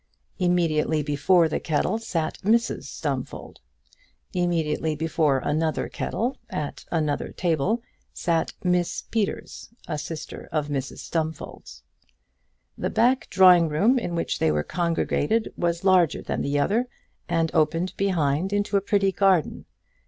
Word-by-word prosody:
Immediately 160 -4 +1
before 160 +4 +3
the 155 - -2
kettle 175 +7 0
sat 170 -8 -3
Mrs 230 +4 +1
Stumfold. - - -5 0.7
Immediately 160 -3 0
before 155 -2 +1
another 155 +4 -1
kettle, 245 +5 -2
at 145 -1 -5
another 155 -4 -1
table, 180 - 0 0.3
sat 165 -2 0
Miss 180 -1 0
Peters, 220 -3 -3 0.2
a 150 - -3
sister 160 +1 -7
of 150 -2 -1
Mrs 135 -2 -4
Stumfold's. 155 - -5 0.9
The - - -2
back 255 +3 +2
drawing 180 -3 +6
room 215 - +3
in 175 -6 -4
which 165 - -2
they 80 - +3
were 75 0 0
congregated 170 - 0
was 170 0 -1
larger 185 -4 +3
than - - -2
the 140 +1 0
other, 220 - +1 0.4
and 165 -1 0
opened 165 +3 +1
behind 175 -2 0
into 205 0 +1
a - - +1
pretty 200 -1 +2
garden. 190 -5 +2
170 Hz, 130 wpm, -25 LUFS, 150-190 Hz, 0.9 s, drawing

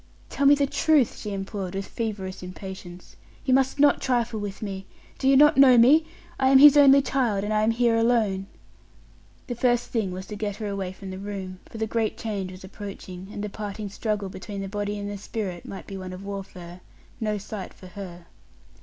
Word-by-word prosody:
"Tell 280 - +1
me 290 - +8
the 285 0 +2
truth!" 290 -2 +2
she 210 - -5
implored, 195 -1 -4
with 195 0 -3
feverish 200 -5 -5
impatience: 185 -1 -9 0.3
"you 260 - +2
must 265 +1 +2
not 290 0 +5
trifle 240 -3 0
with 205 0 -6
me. 195 -2 -5 0.3
Do 265 - 0
you 270 - +6
not 295 +1 +6
know 260 -3 +8
me? 295 +7 +6 0.3
I 265 0 +4
am 270 - +7
his 290 +1 +9
only 280 -1 +7
child, 235 -8 0
and 210 +1 -1
I 215 - +2
am 215 - +3
here 235 0 +2
alone." 220 -5 +1 1.0
The 245 - -4
first 240 0 +1
thing 215 -6 -1
was 185 +1 -6
to 210 - -7
get 205 -1 -3
her 215 0 -5
away 195 -2 -3
from 190 0 -9
the 185 - -7
room, 195 -2 -6
for - - -10
the 220 - -1
great 220 0 -1
change 200 -4 -4
was 185 0 -12
approaching, 190 -1 -9
and 205 - -5
the 210 - -3
parting 205 0 -5
struggle 210 -1 -2
between 195 +2 -7
the 195 - -4
body 205 +1 -3
and 205 0 -5
the 205 -1 -5
spirit 195 -5 -5
might 195 - -8
be 195 - -7
one 185 -1 -7
of 185 +2 -9
warfare 185 -3 -8 0.4
no 215 -2 -1
sight 200 0 -7
for - - -15
her. 180 -2 -9
205 Hz, 210 wpm, -25 LUFS, 190-235 Hz, 1.0 s, his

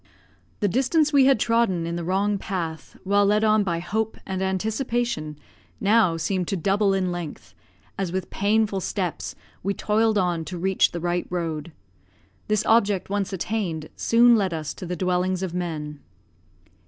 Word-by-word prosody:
The 205 - +3
distance 275 - +2
we 275 -2 +6
had 270 -4 +4
trodden 230 -7 +1
in 170 0 -3
the 170 - -3
wrong 195 +3 0
path, 165 -6 -5
while 200 +1 +3
led 210 +2 +3
on 215 -1 +4
by 175 -4 -1
hope 220 +6 -2
and 190 -1 -3
anticipation, 210 - -1 0.4
now 205 -5 +3
seemed 180 +1 -1
to 195 - -1
double 195 +4 +2
in 185 -2 0
length, 175 -4 -7 0.5
as 190 -3 -1
with 185 0 -4
painful 205 0 +1
steps 185 -2 -3 0.3
we 200 +2 -1
toiled 215 +1 +1
on 175 -4 0
to 180 - -6
reach 190 +2 +2
the 170 - -4
right 175 0 -1
road. 165 -3 -3 0.8
This 215 0 +1
object 205 -4 +2
once 200 -1 -1
attained, 185 -5 -3
soon 235 +1 +5
led 190 -6 0
us 155 -1 -4
to 180 - -8
the 180 - -3
dwellings 180 +1 0
of 180 -3 -3
men. 155 -4 -4
190 Hz, 165 wpm, -24 LUFS, 175-215 Hz, 0.8 s, we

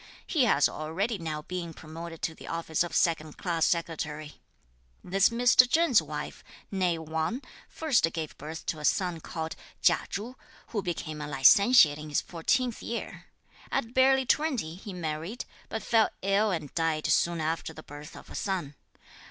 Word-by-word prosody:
He 300 -8 +2
has 145 -10 +4
already 185 +8 -2
now 155 -2 -4
been 170 -1 -5
promoted 165 +1 -9
to 165 - -1
the - - -12
office 165 -1 -2
of 175 - -5
second 155 -3 +1
class 165 -3 +1
Secretary. 155 -3 -3 0.6
This 195 +2 +3
Mr. 245 +1 +5
Cheng's 315 - +4
wife, 150 -1 -6 0.3
nèe 180 -3 +1
Wang, 160 - -2 0.3
first 270 - +2
gave 160 -3 -5
birth 155 +3 -7
to 155 - -2
a - - -8
son 175 +1 +1
called 160 0 -5 0.3
Chia - - +4
Chu, 225 +6 -5 0.3
who 210 - -1
became 155 -4 -4
a 150 - -4
Licentiate 150 - +6
in 150 0 -7
his 145 - +2
fourteenth 240 +8 0
year. 235 - -5 0.5
At 240 -3 -1
barely 265 0 +4
twenty, 255 - +1
he 200 +4 -9
married, 170 +5 -4 0.2
but 220 - -4
fell 225 -2 +3
ill 200 +2 +3
and 160 -7 -3
died 160 -2 0
soon 170 -1 +2
after 160 +1 -2
the 155 0 -11
birth 145 +2 -10
of - - -12
a - - -8
son. 180 -8 -2
170 Hz, 165 wpm, -28 LUFS, 155-215 Hz, 0.6 s, Licentiate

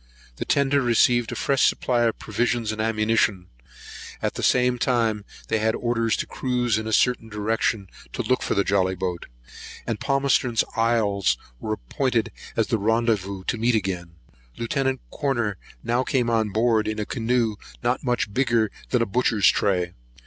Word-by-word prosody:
The - - -4
tender 140 0 +2
received 120 -1 +3
a - - -4
fresh 135 -1 +2
supply 120 -2 0
of 115 - 0
provisions 115 +1 -1
and 110 0 -3
ammunition; 110 -4 +1 0.7
at - - -1
the - - -5
same 125 -1 +3
time 115 -5 +1 0.2
they 110 - +1
had 110 +1 +1
orders 115 -2 0
to - - -2
cruise 120 -4 0
in 110 - -5
a - - -3
certain 120 0 +2
direction, 105 -1 -1 0.3
to - - -2
look 130 0 +1
for - - -1
the 100 - +3
jolly 95 -2 +1
boat; 90 -2 -4 0.6
and 115 -3 -3
Palmerston's 135 -4 +2
Isles 105 - +2 0.2
was 110 - -2
appointed - - -1 0.2
as - - 0
a 115 - +3
rendezvous 105 -3 0
to 115 - -2
meet 120 +1 +2
again. 90 -5 -3 0.4
Lieut. 115 -1 -3 0.4
Corner 120 -8 -1 0.3
now 120 +2 +1
came 125 -3 0
on 110 -2 +1
board, 110 +1 +2
in 110 0 -2
a 105 - -2
canoe 115 -2 0 0.3
not 120 +1 0
much 120 -5 -1
bigger 115 -4 +2 0.2
than 120 -2 +2
a - - 0
butcher's 110 -2 +3
tray. 90 -3 0
115 Hz, 165 wpm, -24 LUFS, 105-120 Hz, 0.7 s, received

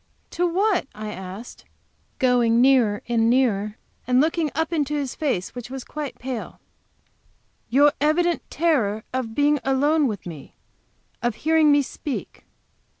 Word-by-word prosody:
"To 355 +1 0
what?" 375 -2 +1
I 215 0 -6
asked, 190 +4 -9 0.5
going 245 -4 +3
nearer 245 -5 +4
and 230 -1 +2
nearer, 215 -5 +1 0.3
and 250 0 +3
looking 315 +1 +1
up 320 +2 -1
into 300 -2 0
his 280 -3 -2
face, 260 - -2
which 245 -1 -8
was 265 -1 -6
quite 300 -3 -6
pale. 250 -2 -5
"To - - -27 1.2
your 290 +1 +6
evident 335 +3 +2
terror 235 -11 +1
of 240 -4 -3
being 290 0 +3
alone 285 +3 +2
with 210 -6 -5
me, 160 -6 -10 0.7
of 240 -2 -1
hearing 315 +1 +3
me 290 0 +4
speak. 275 +1 -6
265 Hz, 145 wpm, -23 LUFS, 230-300 Hz, 1.2 s, your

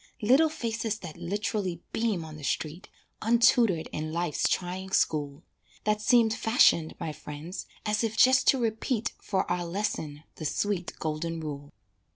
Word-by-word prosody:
Little 270 +9 +5
faces 225 -6 -2
that 165 -4 -8
lit'rally 185 0 -3
beam 215 -8 -1
on 155 -1 -9
the 150 - -10
street, 155 +6 -3 0.3
Untutored 230 -6 +4
in 155 +1 -4
Life's 170 -1 0
trying 185 +1 -2
school, 145 -3 0 0.4
That 210 0 +1
seem 230 0 +4
fashioned, 220 -8 +3
my 155 - -3
friends, 150 +6 -8 0.2
as 210 +1 +1
if 220 -1 -2
just 260 0 +5
to 270 - +6
repeat 230 0 -1
For 190 -2 0
our 175 0 0
lesson 170 -5 -3
the 155 - -6
sweet, 185 +2 -1
golden 165 +1 -3
rule. 145 -2 -6
185 Hz, 150 wpm, -28 LUFS, 160-220 Hz, 0.4 s, to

